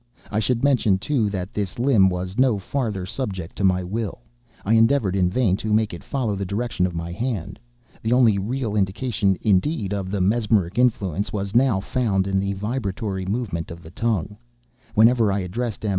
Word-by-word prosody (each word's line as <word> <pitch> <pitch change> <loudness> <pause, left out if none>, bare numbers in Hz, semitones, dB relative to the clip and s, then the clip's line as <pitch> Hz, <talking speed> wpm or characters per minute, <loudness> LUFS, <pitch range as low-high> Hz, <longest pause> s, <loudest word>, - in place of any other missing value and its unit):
I 105 - +1
should 115 +3 0
mention, 125 -9 +3
too, 115 0 0
that 95 +1 -4
this 100 -3 -3
limb 120 -6 +4
was 90 +4 -4
no 130 -5 +4
farther 105 -2 -3
subject 95 -5 -5
to 100 - -2
my 95 -1 +3
will. 105 - -4 0.4
I 105 - +2
endeavored 115 -3 +3
in 90 -2 +2
vain 100 -2 +1
to 110 0 -3
make 110 -2 +1
it 85 - -8
follow 125 -6 -2
the 100 - -3
direction 100 -1 -1
of 90 - -7
my 85 +1 -4
hand. 110 -2 -3 0.4
The 110 - -2
only 120 -5 +4
real 115 +1 -2
indication, 100 0 0
indeed, 105 - +1
of 95 -2 -3
the 100 +1 -2
mesmeric 105 0 +1
influence, 100 -6 +1
was 100 -1 -3
now 120 -4 +3
found 100 -5 0
in 95 0 0
the 100 +1 -1
vibratory 100 -2 -3
movement 100 -6 -2
of 85 0 -9
the 80 - -12
tongue, 105 -2 -1 0.6
whenever 115 -1 +5
I 100 0 0
addressed 110 +5 -4
M. - - 0
105 Hz, 190 wpm, -23 LUFS, 95-115 Hz, 0.6 s, whenever